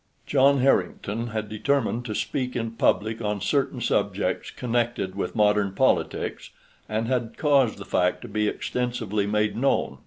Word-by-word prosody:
John 140 -1 +4
Harrington 115 -4 +1
had 110 -2 -3
determined 120 +2 0
to 110 -3 -4
speak 125 -2 -2
in 115 -2 -2
public 110 0 +1
on 105 -2 -1
certain - - 0
subjects - - 0
connected 120 -5 -1
with 100 - -4
modern 105 -2 +3
politics, - - 0 0.4
and 110 +1 -1
had 120 -3 -2
caused 140 -6 +3
the 100 - -8
fact 90 +2 +1
to - - -7
be 105 -1 0
extensively 110 -4 -2
made 105 0 +1
known. 135 +4 0
115 Hz, 150 wpm, -25 LUFS, 105-125 Hz, 0.4 s, John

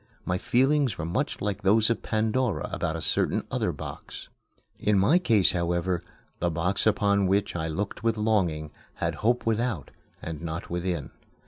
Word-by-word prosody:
My 90 0 0
feelings 135 -3 +2
were 80 - -3
much 130 - -2
like 105 0 -2
those 110 +3 +4
of 115 - -1
Pandora 110 +1 0
about - - -2
a - - -4
certain - - +1
other - - 0
box. - - -8 0.5
In 105 -1 +2
my 140 - +5
case, 110 - +4
however, 85 0 0 0.4
the 85 - +1
box 85 +6 0
upon 100 -2 +3
which 100 0 +1
I 80 -1 -1
looked 100 +6 -3
with 115 -1 +1
longing 90 -9 +1 0.2
had - - -1
Hope 120 +2 +2
without, 115 - -1 0.3
and 80 -2 -6
not 85 0 -5
within. 85 -3 -2
100 Hz, 160 wpm, -27 LUFS, 85-110 Hz, 0.5 s, my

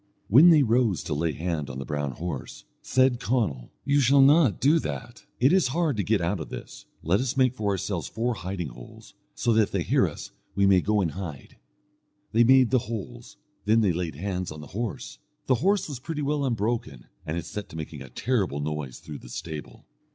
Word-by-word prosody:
When 145 - +8
they 155 -4 +6
rose 115 - +2
to 80 - -3
lay 80 +2 0
hand 80 -2 -3
on 65 - -6
the 70 - -5
brown 75 -2 -3
horse, 75 -6 -6 0.2
said 130 -1 +2
Conall, 110 - -1 0.2
"You 145 0 +3
shall 135 +1 +5
not 145 -4 +5
do 150 +5 +4
that. 120 -4 -6
It 130 +7 +4
is 190 -7 +4
hard 165 -6 +1
to 100 - 0
get 105 -1 +1
out 85 +3 -1
of 80 - -6
this; - - -9 0.2
let 90 +5 +2
us 130 +1 -2
make 130 -2 +4
for 105 -5 -2
ourselves 95 -3 -2
four 120 +2 -1
hiding 90 -5 -4
holes, - - -13 0.2
so 120 - +1
that 110 - +5
if 105 - 0
they 95 -3 0
hear - - +3
us - - -8 0.2
we 100 0 +3
may 95 -2 +5
go 105 +1 +1
and 85 -4 0
hide." 85 -8 -8 0.7
They 115 +2 +5
made 130 0 +5
the 130 - +4
holes, 115 +2 -7 0.3
then 110 +2 +4
they 100 -5 +2
laid 85 -3 -3
hands 90 +1 -3
on 75 0 -8
the 75 - -12
horse. 120 +6 -5 0.3
The 130 - +3
horse 200 +1 +2
was 140 -5 -6
pretty 150 +2 -4
well 145 0 0
unbroken, 110 - -2 0.2
and 80 +2 -3
he 85 - -3
set 100 +5 -7
to - - -11
making 80 -2 -6
a 65 - -9
terrible 100 - -1
noise 75 -3 -4
through 75 -2 -9
the - - -13
stable. 80 -3 -7
100 Hz, 215 wpm, -26 LUFS, 80-125 Hz, 0.7 s, When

